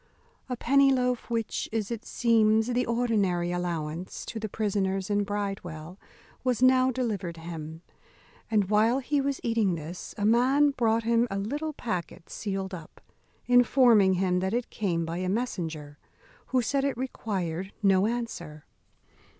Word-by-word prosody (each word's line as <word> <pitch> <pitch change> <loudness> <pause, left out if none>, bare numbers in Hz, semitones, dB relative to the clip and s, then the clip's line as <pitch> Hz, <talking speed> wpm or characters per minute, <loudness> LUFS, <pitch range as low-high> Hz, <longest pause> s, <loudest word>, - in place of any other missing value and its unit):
A 250 - -2
penny 275 +3 +4
loaf, 250 -2 0
which 230 -2 -2
is, 220 -1 -2
it 230 -1 -5
seems, 220 -2 +3
the 250 +1 0
ordinary 205 -8 +1
allowance 170 -1 -4
to 225 - -5
the 215 -1 -4
prisoners 195 -2 -1
in 205 0 +2
Bridewell, 195 -4 -5 0.4
was 250 -3 +1
now 255 0 +5
delivered 210 -9 -2
him; 160 0 -8 0.7
and 210 -3 +1
while 220 +4 +4
he 280 +2 0
was 275 0 -1
eating 225 -6 +1
this 165 +3 -8
a 205 - -1
man 260 +6 +4
brought 230 -4 +1
him 235 +1 +2
a 195 - -3
little 290 +10 -3
packet 180 - -5
sealed 195 -2 -4
up, 165 -4 -9 0.5
informing 245 -5 +5
him 180 0 +1
that 190 +4 -1
it 245 0 -3
came 170 -5 -1
by 165 +1 -4
a 185 0 -1
messenger, 165 -10 -3 0.5
who 255 -1 +1
said 275 +4 0
it 275 -3 -1
required 190 -8 -3
no 195 0 +4
answer. 175 -11 -5
210 Hz, 150 wpm, -27 LUFS, 180-245 Hz, 0.7 s, now